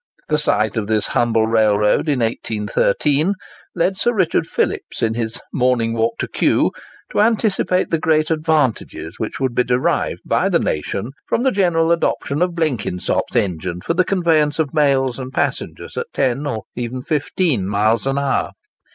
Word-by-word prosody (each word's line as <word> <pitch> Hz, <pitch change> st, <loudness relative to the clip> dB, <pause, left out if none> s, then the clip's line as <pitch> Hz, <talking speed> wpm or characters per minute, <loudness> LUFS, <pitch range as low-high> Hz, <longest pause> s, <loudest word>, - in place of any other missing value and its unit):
The 150 Hz, 0 st, +2 dB
sight 110 Hz, -7 st, +1 dB
of 105 Hz, -2 st, -1 dB
this 110 Hz, -2 st, +1 dB
humble 115 Hz, -2 st, +1 dB
railroad 110 Hz, +4 st, +2 dB
in 135 Hz, -4 st, +1 dB
1813 115 Hz, -, 0 dB, 0.4 s
led 180 Hz, +2 st, +1 dB
Sir 240 Hz, -, +3 dB
Richard 190 Hz, -8 st, +1 dB
Phillips -, -, -2 dB
in 110 Hz, -1 st, +2 dB
his 115 Hz, 0 st, -3 dB
'Morning 125 Hz, -3 st, +1 dB
Walk 115 Hz, 0 st, 0 dB
to -, -, -3 dB
Kew' -, -, +2 dB, 0.4 s
to -, -, +2 dB
anticipate 210 Hz, -4 st, +1 dB
the 165 Hz, -, +1 dB
great 155 Hz, 0 st, +2 dB
advantages 155 Hz, -6 st, -1 dB
which -, -, -4 dB
would 130 Hz, -2 st, 0 dB
be 125 Hz, -, +2 dB
derived 125 Hz, +1 st, 0 dB
by -, -, +1 dB
the -, -, +3 dB
nation 95 Hz, -, -2 dB, 0.2 s
from 235 Hz, -, 0 dB
the 265 Hz, -, +3 dB
general 170 Hz, -5 st, +2 dB
adoption 165 Hz, -3 st, 0 dB
of 180 Hz, -1 st, +1 dB
Blenkinsop's 125 Hz, -, -1 dB
engine 90 Hz, -1 st, -1 dB
for 165 Hz, -, -1 dB
the 185 Hz, +2 st, +3 dB
conveyance 165 Hz, -6 st, +2 dB
of 155 Hz, -4 st, -1 dB
mails 135 Hz, -4 st, +2 dB
and 130 Hz, 0 st, -6 dB
passengers -, -, -3 dB
at 475 Hz, -, -3 dB
ten 135 Hz, +3 st, 0 dB
or 110 Hz, -6 st, -3 dB
even 125 Hz, +1 st, -4 dB
fifteen 150 Hz, -, 0 dB
miles 105 Hz, +4 st, +1 dB
an 135 Hz, 0 st, 0 dB
hour. 140 Hz, -1 st, 0 dB
135 Hz, 165 wpm, -19 LUFS, 115-165 Hz, 0.4 s, Sir